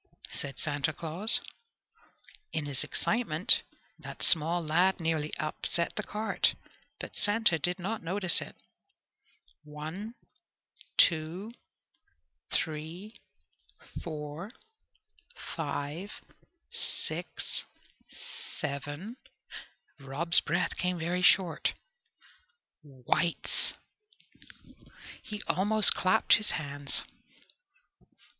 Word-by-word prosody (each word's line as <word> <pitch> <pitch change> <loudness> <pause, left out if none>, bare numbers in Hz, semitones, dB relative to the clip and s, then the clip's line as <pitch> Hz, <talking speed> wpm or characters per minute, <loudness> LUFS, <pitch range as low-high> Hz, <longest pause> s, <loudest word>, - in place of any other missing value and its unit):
said 140 -2 -5
Santa 145 0 -1
Claus. 170 +8 +4 1.1
In 155 -2 -2
his 140 -3 -2
excitement 200 -8 +2 0.4
that - - -6
small 170 +1 +4
lad 180 +5 +3
nearly 160 -2 -1
upset 165 +2 -1
the - - -2
cart, 215 +1 0 0.4
but - - -8
Santa 205 -5 +4
did 180 +4 -1
not 200 +5 -4
notice 185 +1 +2
it. - - -9 1.1
"One, 160 +10 -7 0.8
two, 170 +6 +3 1.0
three, 165 +7 -3 0.9
four, 155 +3 -6 1.1
five, 150 +4 -4 0.6
six, - - -1 1.0
seven" 145 - -5 0.8
Rob's 145 +5 +5
breath 175 +4 -1
came 180 0 -1
very 175 +2 -1
short 180 -2 +3 1.1
"whites!" 145 +4 0 1.5
He 210 -1 -7
almost 210 +2 +5
clapped 200 +4 +3
his 210 - -4
hands. 145 -2 -2
170 Hz, 80 wpm, -30 LUFS, 150-190 Hz, 1.5 s, Rob's